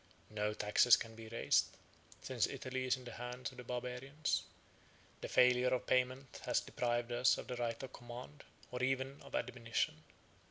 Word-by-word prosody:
No 105 0 -1
taxes 105 +4 +6
can 115 - -6
be 110 0 -10
raised, 115 +1 +3 0.6
since - - +1
Italy 130 0 -3
is 130 0 +2
in 130 - -11
the 120 - -6
hands 125 +2 -5
of 130 - -15
the 125 - -7
Barbarians; 125 +5 -2 0.8
the - - -4
failure 125 0 +5
of 130 - 0
payment 130 +1 0
has - - +3
deprived 120 0 -1
us 120 +1 +4
of - - -6
the 125 - -4
right 120 0 -2
of 130 - -7
command, 125 +4 -9 0.3
or 125 0 -3
even 135 +1 0
of - - -8
admonition. 115 -2 -1
125 Hz, 170 wpm, -37 LUFS, 120-130 Hz, 0.8 s, taxes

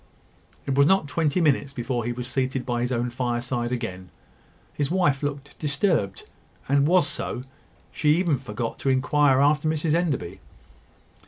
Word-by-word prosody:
It 135 - -1
was 140 +1 +5
not 190 -4 +3
twenty 160 +2 0
minutes 140 -3 +1
before 120 -2 -2
he 120 - -1
was 125 0 -5
seated 130 -1 -1
by 120 -1 -1
his 125 +1 -1
own 120 0 -1
fireside 120 0 -2
again. 95 -7 -4 0.6
His 145 -2 -1
wife 170 -6 +2
looked 140 -1 -5
disturbed; 140 - 0 0.4
and 140 +1 +3
was 180 -1 +4
so; 125 -3 -4 0.5
she 150 0 +2
even 170 -6 +1
forgot 115 -2 -5
to 135 - -1
inquire 135 +1 +3
after 150 +2 +3
Mrs 155 0 0
Enderby. 145 - -1
135 Hz, 155 wpm, -25 LUFS, 120-150 Hz, 0.6 s, was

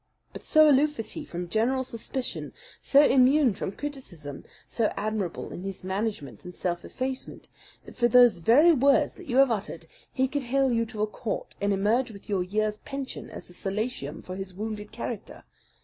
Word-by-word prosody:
But - - -8
so 310 -1 +5
aloof 295 +1 +4
is 225 - -4
he - - -5
from 175 0 -6
general 240 +7 +1
suspicion, 250 +1 -4 0.3
so 285 +1 +5
immune 265 -1 +5
from 190 - -4
criticism, 195 - -7 0.2
so 225 -3 0
admirable 210 -4 -3
in - - -7
his 195 -1 -6
management 190 - -3
and 180 -1 -9
self 175 -1 -2
effacement, 260 0 -5 0.4
that - - -12
for 240 -1 +3
those 240 -5 +6
very 275 - +6
words 280 -1 +3
that - - -13
you 255 -1 0
have 270 -2 +6
uttered 195 -6 -4 0.3
he 265 0 +1
could 285 +2 -2
hale 265 +1 +1
you 230 -1 +1
to 215 -1 -3
a - - +4
court 215 +1 -5
and 200 0 +1
emerge 215 +6 +2
with 200 -3 -12
your 195 -3 +1
year's 210 +3 -1
pension 275 -1 -6
as - - -9
a - - -11
solatium 195 - -4
for 185 - -7
his 190 -1 -7
wounded 210 0 -5
character. 230 -1 -6
225 Hz, 185 wpm, -27 LUFS, 195-260 Hz, 0.4 s, those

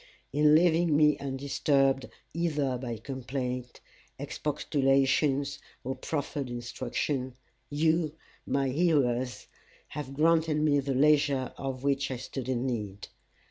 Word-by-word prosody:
In 150 +1 +5
leaving 165 -2 +4
me 150 -1 +5
undisturbed 135 0 +1 0.2
either 150 -5 0
by 120 -3 -4
complaint, 125 -1 -5 0.4
expostulation, 135 +1 +1 0.4
or 130 - -2
proffered 140 0 -3
instruction, 125 +2 -3 0.3
you, 160 +1 +1 0.3
my 135 -1 0
hearers, 130 -5 +1 0.4
have 140 -2 -6
granted 160 0 +3
me 150 -2 +3
the 135 -1 -1
leisure 140 -2 +3
of 135 -1 -5
which 140 0 +1
I 130 - -3
stood 130 +1 -6
in 125 0 0
need. 105 -6 -4
135 Hz, 110 wpm, -29 LUFS, 130-150 Hz, 0.4 s, In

